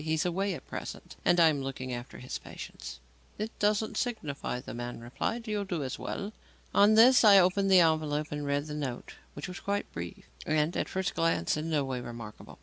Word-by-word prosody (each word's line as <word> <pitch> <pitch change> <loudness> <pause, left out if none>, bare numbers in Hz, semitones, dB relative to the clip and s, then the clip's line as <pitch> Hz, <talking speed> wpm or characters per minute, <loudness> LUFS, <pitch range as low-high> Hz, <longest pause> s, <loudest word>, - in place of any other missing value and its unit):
He 160 0 0
is 155 - 0
away 190 +2 0
at - - -10
present - - -7
and 175 - +4
I 165 -1 +7
am 145 -3 -1
looking 130 -1 -4
after 120 +1 -7
his 125 - -6
patients." 65 +1 -9 0.4
"It 215 +2 -3
doesn't 210 +1 +1
signify," 150 - -2
the - - -8
man 120 0 -5
replied. 225 - -3
"You'll 210 -1 -1
do 175 -6 -3
as 130 - -4
well." 205 +2 -4 0.4
On 205 +2 +6
this, 240 +1 +7
I 205 -2 +9
opened 195 +1 +4
the 185 -2 +8
envelope 155 -2 +1
and 150 0 -3
read 145 0 0
the 150 - -6
note, 135 -5 -4 0.2
which 145 - -5
was 180 +1 -7
quite 200 0 -2
brief, 85 0 -7 0.2
and, 155 +2 +1
at - - -1
first 190 +1 -2
sight, 165 - +1
in 155 +2 -3
no 150 -3 +1
way 130 -2 -3
remarkable. 115 -3 -9
155 Hz, 210 wpm, -30 LUFS, 135-195 Hz, 0.4 s, I